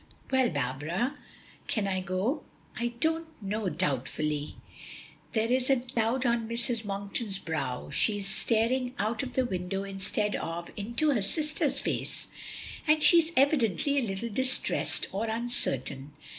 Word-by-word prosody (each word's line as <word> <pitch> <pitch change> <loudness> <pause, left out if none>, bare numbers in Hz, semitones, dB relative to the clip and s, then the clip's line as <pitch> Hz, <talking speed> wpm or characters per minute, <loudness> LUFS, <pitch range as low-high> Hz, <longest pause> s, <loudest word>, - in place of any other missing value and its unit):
"Well, 260 -2 +4
Barbara, 150 - -1 0.5
can 210 -3 0
I 190 -1 0
go?" 190 - -1 0.3
"I 240 0 -2
don't 325 +3 +1
know" 210 -1 -2
doubtfully. 150 -1 -1 0.8
There 220 -2 +2
is 255 +1 +2
a 270 - +6
cloud 245 0 0
on 235 -2 +1
Mrs. 235 -1 -1
Monkton's 200 0 -3
brow, 145 -9 -3
she 210 -2 +2
is 200 -1 +1
staring 245 +5 +2
out 220 +3 0
of 260 -2 -5
the 260 - +2
window 190 -2 -2
instead 200 +2 -1
of 170 +1 -4
into 235 +9 +1
her 235 -7 +2
sister's 305 - 0
face, - - -2 0.6
and 305 0 +4
she 345 - +9
is 325 0 +1
evidently 275 - +3
a - - 0
little 220 0 -3
distressed 260 +4 +2
or 210 +4 -2
uncertain. 145 - -1
220 Hz, 145 wpm, -29 LUFS, 185-255 Hz, 0.8 s, she